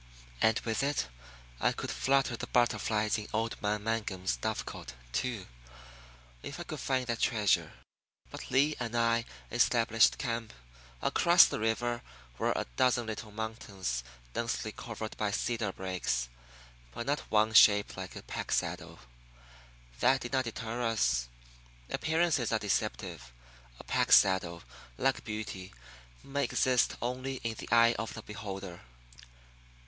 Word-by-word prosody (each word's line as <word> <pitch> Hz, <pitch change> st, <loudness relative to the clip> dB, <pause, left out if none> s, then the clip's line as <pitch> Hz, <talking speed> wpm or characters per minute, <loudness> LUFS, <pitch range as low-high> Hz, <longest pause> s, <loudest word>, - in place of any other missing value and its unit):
And 110 Hz, -, +4 dB
with 115 Hz, -1 st, -1 dB
it 140 Hz, -, 0 dB, 0.5 s
I -, -, +2 dB
could -, -, -4 dB
flutter 135 Hz, -2 st, +2 dB
the -, -, -6 dB
butterflies 110 Hz, -3 st, +1 dB
in 105 Hz, -, -7 dB
old 115 Hz, +1 st, -2 dB
man 105 Hz, 0 st, -1 dB
Mangum's 105 Hz, -4 st, -1 dB
dovecot, 110 Hz, -, -4 dB, 0.2 s
too. 100 Hz, -, -2 dB, 1.0 s
If -, -, -7 dB
I -, -, -3 dB
could -, -, -6 dB
find 130 Hz, -1 st, 0 dB
that 115 Hz, -1 st, -2 dB
treasure! 105 Hz, -4 st, +2 dB, 0.6 s
But -, -, -8 dB
Lee 145 Hz, +4 st, +3 dB
and 120 Hz, -1 st, -3 dB
I 115 Hz, 0 st, +2 dB, 0.3 s
established 115 Hz, -1 st, +4 dB
camp. 115 Hz, -3 st, -3 dB, 0.5 s
Across -, -, +6 dB
the -, -, -2 dB
river 120 Hz, +2 st, 0 dB, 0.4 s
were -, -, +2 dB
a -, -, -2 dB
dozen 125 Hz, -2 st, +3 dB
little 110 Hz, 0 st, -5 dB
mountains 105 Hz, -, -4 dB, 0.3 s
densely 115 Hz, -2 st, -2 dB
covered 110 Hz, -1 st, -6 dB
by 105 Hz, -, 0 dB
cedar 110 Hz, 0 st, -1 dB
brakes, 75 Hz, -12 st, -2 dB, 0.7 s
but 120 Hz, -, -4 dB
not 145 Hz, +2 st, +1 dB
one 110 Hz, +1 st, +3 dB
shaped 105 Hz, -1 st, +6 dB
like 95 Hz, -1 st, -7 dB
a -, -, -8 dB
pack -, -, -5 dB
saddle. -, -, -2 dB, 1.0 s
That 130 Hz, +2 st, +4 dB
did 120 Hz, -, -6 dB
not 130 Hz, -1 st, +2 dB
deter 115 Hz, +1 st, -4 dB
us. 110 Hz, -, +1 dB, 0.6 s
Appearances 160 Hz, -5 st, +1 dB
are 110 Hz, -, +3 dB
deceptive. 95 Hz, -, -2 dB, 0.5 s
A -, -, -9 dB
pack -, -, 0 dB
saddle, 90 Hz, -3 st, +5 dB, 0.3 s
like 135 Hz, 0 st, +1 dB
beauty, 105 Hz, -4 st, -5 dB, 0.5 s
may 140 Hz, +1 st, -1 dB
exist 125 Hz, 0 st, +2 dB
only 130 Hz, +2 st, -2 dB
in 115 Hz, -1 st, -1 dB
the -, -, -7 dB
eye 115 Hz, 0 st, +6 dB
of 110 Hz, -, -4 dB
the 115 Hz, -, -8 dB
beholder. 95 Hz, -4 st, -7 dB
110 Hz, 140 wpm, -31 LUFS, 105-120 Hz, 1.0 s, Across